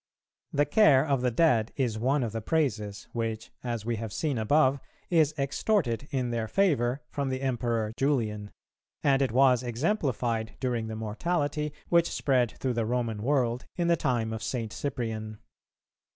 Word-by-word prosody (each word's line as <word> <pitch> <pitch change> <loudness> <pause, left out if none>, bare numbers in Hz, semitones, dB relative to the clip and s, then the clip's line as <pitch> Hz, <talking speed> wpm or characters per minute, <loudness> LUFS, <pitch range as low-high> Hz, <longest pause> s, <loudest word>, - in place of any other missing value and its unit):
The 145 +1 +2
care 145 -4 +5
of 140 -4 +1
the 125 - +2
dead 120 -4 +2
is 120 -5 -1
one 135 +4 +1
of 115 - -2
the 115 +1 -4
praises 105 -8 -1
which, 115 -1 -3
as 120 -3 -3
we 115 -1 -1
have 110 -1 -5
seen 140 +2 -1
above, 135 +4 +3 0.3
is 155 -3 +3
extorted 140 - 0
in 125 -3 -1
their 115 -1 -1
favour 135 - +1
from 140 -2 -2
the 130 0 -2
Emperor 120 -4 -1
Julian; 110 -7 0 0.5
and 140 -1 +3
it 135 - +1
was 130 0 +4
exemplified 120 - -1
during 120 -3 -1
the 110 - -5
mortality 145 +7 -1 0.2
which 170 -1 +4
spread 125 -5 +1
through 130 -2 -1
the 115 -1 0
Roman 115 -3 -1
world 125 -1 0
in 175 -1 0
the 170 - +5
time 120 -8 -1
of 110 - -5
St. 115 -4 -3
Cyprian. 110 -5 -4
125 Hz, 165 wpm, -28 LUFS, 115-145 Hz, 0.5 s, care